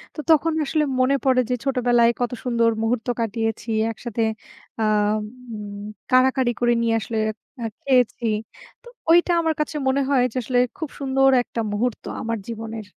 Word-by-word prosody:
তো -, -, -8 dB
তখন 320 Hz, 0 st, +4 dB
আসলে 305 Hz, +2 st, +1 dB, 0.2 s
মনে 255 Hz, +2 st, +3 dB
পড়ে 255 Hz, -1 st, +4 dB
যে, 250 Hz, -, +2 dB
ছোটবেলায় 245 Hz, -3 st, +3 dB
কত 245 Hz, -, 0 dB
সুন্দর 235 Hz, -2 st, +2 dB
মুহূর্ত 225 Hz, +1 st, -1 dB
কাটিয়েছি 225 Hz, 0 st, -2 dB, 0.2 s
একসাথে, 230 Hz, 0 st, -3 dB, 0.6 s
আ -, -, +2 dB, 0.7 s
উম 205 Hz, -1 st, -7 dB, 0.3 s
কাড়াকাড়ি 255 Hz, 0 st, +4 dB
করে 240 Hz, 0 st, +3 dB
নিয়ে 230 Hz, -1 st, +1 dB
আসলে 225 Hz, +1 st, -4 dB, 0.5 s
আ -, -, -1 dB, 0.2 s
খেয়েছি। 250 Hz, -3 st, +2 dB, 0.6 s
তো -, -, -16 dB, 0.2 s
ঐটা 345 Hz, +2 st, +5 dB
আমার 320 Hz, -1 st, +1 dB
কাছে 300 Hz, 0 st, -2 dB
মনে 265 Hz, +1 st, +2 dB
হয় 265 Hz, -3 st, +3 dB
যে, -, -, -4 dB
আসলে 245 Hz, +2 st, +1 dB, 0.2 s
খুব 315 Hz, -4 st, -4 dB
সুন্দর 270 Hz, 0 st, +3 dB
একটা 235 Hz, -, -6 dB
মুহূর্ত 225 Hz, +3 st, -1 dB, 0.2 s
আমার 230 Hz, 0 st, -2 dB
জীবনের। 225 Hz, -1 st, -6 dB
245 Hz, 155 wpm, -23 LUFS, 230-270 Hz, 0.7 s, ঐটা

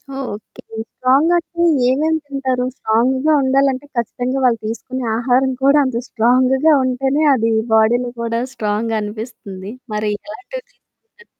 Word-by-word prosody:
Okay. 225 Hz, -6 st, -7 dB, 0.3 s
స్ట్రాంగంటే 335 Hz, +6 st, +1 dB, 0.2 s
ఏమేమి 315 Hz, +5 st, +1 dB
తింటారు? 260 Hz, -3 st, -1 dB
స్ట్రాంగ్‌గా 260 Hz, +7 st, +1 dB
ఉండాలంటే 270 Hz, +1 st, +1 dB
ఖచ్చితంగా 245 Hz, +3 st, -2 dB
వాళ్ళు 235 Hz, -3 st, +3 dB
తీసుకునే 245 Hz, +3 st, -5 dB
ఆహారం 260 Hz, +2 st, +2 dB
కూడా 280 Hz, +2 st, +5 dB
అంత 240 Hz, -2 st, -2 dB
స్ట్రాంగ్‌గా 260 Hz, +6 st, +3 dB
ఉంటేనే 265 Hz, +4 st, 0 dB
అది 230 Hz, -2 st, +1 dB, 0.2 s
బాడీలో 240 Hz, +3 st, +3 dB
కూడా 230 Hz, 0 st, -1 dB
స్ట్రాంగనిపిస్తుంది. 215 Hz, -2 st, -4 dB, 0.2 s
మరి 210 Hz, 0 st, -1 dB
ఎలాంటివి 400 Hz, +11 st, -8 dB
తీసుకుంటారు? 470 Hz, -1 st, -27 dB
255 Hz, 110 wpm, -18 LUFS, 230-275 Hz, 0.3 s, కూడా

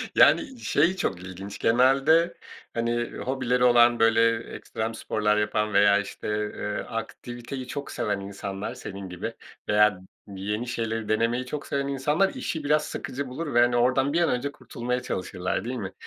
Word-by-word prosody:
Yani, 260 Hz, -2 st, +4 dB
şey 170 Hz, +1 st, +2 dB
çok 95 Hz, -, -2 dB
ilginç 95 Hz, +2 st, -8 dB
genelde, 135 Hz, +8 st, +4 dB, 0.4 s
hani, 120 Hz, 0 st, -1 dB
hobileri 125 Hz, -1 st, 0 dB
olan, 120 Hz, -1 st, +6 dB
böyle, 115 Hz, 0 st, +4 dB, 0.2 s
ekstrem 110 Hz, +1 st, -4 dB
sporlar 105 Hz, -1 st, 0 dB
yapan 105 Hz, 0 st, 0 dB
veya, 100 Hz, 0 st, +5 dB
işte, 100 Hz, -, -6 dB, 0.3 s
eee, 105 Hz, 0 st, -3 dB
aktiviteyi 120 Hz, +3 st, -6 dB
çok 140 Hz, +2 st, -5 dB
seven 105 Hz, -1 st, -1 dB
insanlar 100 Hz, +2 st, -5 dB
senin 100 Hz, -6 st, -7 dB
gibi 100 Hz, +6 st, -5 dB, 0.4 s
veya 105 Hz, -2 st, +4 dB, 0.3 s
yeni 105 Hz, +4 st, -4 dB
şeyleri 115 Hz, -2 st, -3 dB
denemeyi 115 Hz, +3 st, +1 dB
çok 145 Hz, +3 st, -5 dB
seven 140 Hz, 0 st, -1 dB
insanlar 150 Hz, +8 st, +1 dB
işi 160 Hz, -2 st, -4 dB
biraz 150 Hz, +1 st, +2 dB
sıkıcı 140 Hz, -1 st, -5 dB
bulur 145 Hz, +4 st, -5 dB
ve, 120 Hz, -, +4 dB
hani, 120 Hz, 0 st, +3 dB
oradan 130 Hz, +3 st, +2 dB
bir 170 Hz, -, +2 dB
an 170 Hz, -, +3 dB
önce 125 Hz, +3 st, -1 dB
kurtulmaya 125 Hz, -1 st, -4 dB
çalışırlar, 90 Hz, -3 st, -3 dB
değil 125 Hz, +2 st, -3 dB
mi? 100 Hz, -5 st, -5 dB
120 Hz, 155 wpm, -26 LUFS, 105-135 Hz, 0.4 s, olan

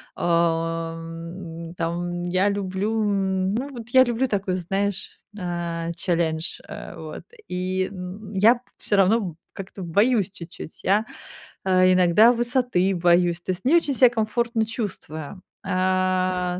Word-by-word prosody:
А, 165 Hz, -1 st, 0 dB
м, 165 Hz, 0 st, -8 dB
там, 175 Hz, +1 st, -2 dB
я 185 Hz, +3 st, +2 dB
люблю, 200 Hz, +2 st, -1 dB
м, 190 Hz, -2 st, 0 dB
ну, 260 Hz, +5 st, -2 dB
вот 240 Hz, -4 st, -9 dB
я 260 Hz, +1 st, +7 dB
люблю 240 Hz, +1 st, 0 dB
такой, 195 Hz, -5 st, -1 dB
знаешь, 195 Hz, +2 st, -2 dB, 0.2 s
э, 170 Hz, -2 st, -3 dB
челлендж, 165 Hz, -3 st, -1 dB
э, -, -, -8 dB
вот. -, -, -8 dB, 0.2 s
И, 185 Hz, +1 st, -1 dB
м, 195 Hz, +2 st, -8 dB
я 220 Hz, +5 st, +5 dB, 0.2 s
всё 205 Hz, -, 0 dB
равно 195 Hz, -3 st, +3 dB, 0.2 s
как-то 195 Hz, 0 st, -8 dB
боюсь 205 Hz, +3 st, +2 dB
чуть-чуть, 170 Hz, -3 st, -10 dB
я, 205 Hz, +3 st, +3 dB, 0.6 s
э, 185 Hz, -1 st, +5 dB
иногда 185 Hz, +6 st, +6 dB
высоты 240 Hz, -6 st, +1 dB
боюсь, 175 Hz, 0 st, +3 dB
то 185 Hz, -, -2 dB
есть 185 Hz, 0 st, -5 dB
не 290 Hz, +6 st, +5 dB
очень 315 Hz, -4 st, +3 dB
ся 255 Hz, -1 st, +6 dB
комфортно 230 Hz, 0 st, 0 dB
чувствую. 190 Hz, -, -5 dB, 0.2 s
А, 185 Hz, -1 st, +1 dB
185 Hz, 135 wpm, -24 LUFS, 175-215 Hz, 0.6 s, я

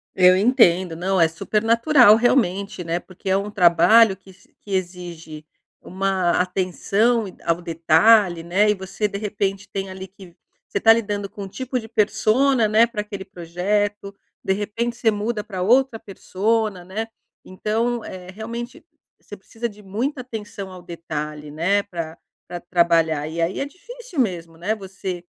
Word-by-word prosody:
Eu 185 Hz, 0 st, +6 dB
entendo 185 Hz, -6 st, +3 dB
não, 185 Hz, +3 st, 0 dB
é 165 Hz, -, +6 dB
super 195 Hz, +6 st, -2 dB
natural 235 Hz, 0 st, +6 dB
realmente, 200 Hz, -6 st, +1 dB
né, 170 Hz, +1 st, -2 dB
porque 185 Hz, +1 st, -9 dB
é 190 Hz, -, +3 dB
um 205 Hz, +1 st, -4 dB
trabalho 190 Hz, +4 st, +5 dB
que 190 Hz, 0 st, -17 dB
se 185 Hz, -, -26 dB
que 205 Hz, -, -12 dB
exige, 175 Hz, -4 st, -5 dB, 0.4 s
uma 190 Hz, -1 st, -1 dB
atenção 195 Hz, +5 st, 0 dB, 0.2 s
ao 170 Hz, +1 st, 0 dB
detalhe, 170 Hz, +2 st, +3 dB
né, 195 Hz, +5 st, +2 dB
e 210 Hz, -, +4 dB
você 195 Hz, +2 st, -3 dB
de 200 Hz, -1 st, -5 dB
repente 200 Hz, -1 st, -3 dB
tem 195 Hz, -1 st, -4 dB
ali 190 Hz, 0 st, -8 dB
que 185 Hz, -2 st, -16 dB, 0.3 s
você 200 Hz, -, -2 dB
tá 225 Hz, -, +7 dB
lidando 205 Hz, -3 st, 0 dB
com 200 Hz, -, -8 dB
um -, -, -6 dB
tipo 255 Hz, +4 st, -4 dB
de 225 Hz, -, -10 dB
persona, 225 Hz, +3 st, +2 dB
né, 220 Hz, +2 st, +5 dB
pra 225 Hz, -3 st, -4 dB
aquele 200 Hz, -2 st, -7 dB
projeto, 200 Hz, +3 st, -2 dB, 0.3 s
de 190 Hz, -, +1 dB
repente 230 Hz, +4 st, -3 dB
você 225 Hz, -2 st, +2 dB
muda 210 Hz, +1 st, -3 dB
pra 190 Hz, -4 st, -6 dB
outra 245 Hz, +3 st, +3 dB
persona, 205 Hz, 0 st, -2 dB
né. 210 Hz, +5 st, -5 dB, 0.4 s
Então 225 Hz, +5 st, -2 dB
é 185 Hz, -1 st, -9 dB
realmente 235 Hz, +4 st, -7 dB, 0.4 s
você -, -, -11 dB
precisa 235 Hz, 0 st, -6 dB
de 210 Hz, 0 st, -15 dB
muita 245 Hz, +8 st, -3 dB
atenção 210 Hz, -5 st, -7 dB
ao 185 Hz, -1 st, -11 dB
detalhe, 150 Hz, -3 st, -6 dB
né, 185 Hz, +7 st, +1 dB
pra 165 Hz, -5 st, -6 dB, 0.3 s
pra 175 Hz, -1 st, -7 dB
trabalhar 165 Hz, -4 st, +2 dB
e 165 Hz, +2 st, -4 dB
aí 170 Hz, +3 st, -1 dB
é -, -, -1 dB
difícil 455 Hz, -, -9 dB
mesmo, 170 Hz, -7 st, -3 dB
né, 185 Hz, +6 st, -1 dB
você 190 Hz, -3 st, -6 dB
195 Hz, 165 wpm, -22 LUFS, 180-220 Hz, 0.4 s, tá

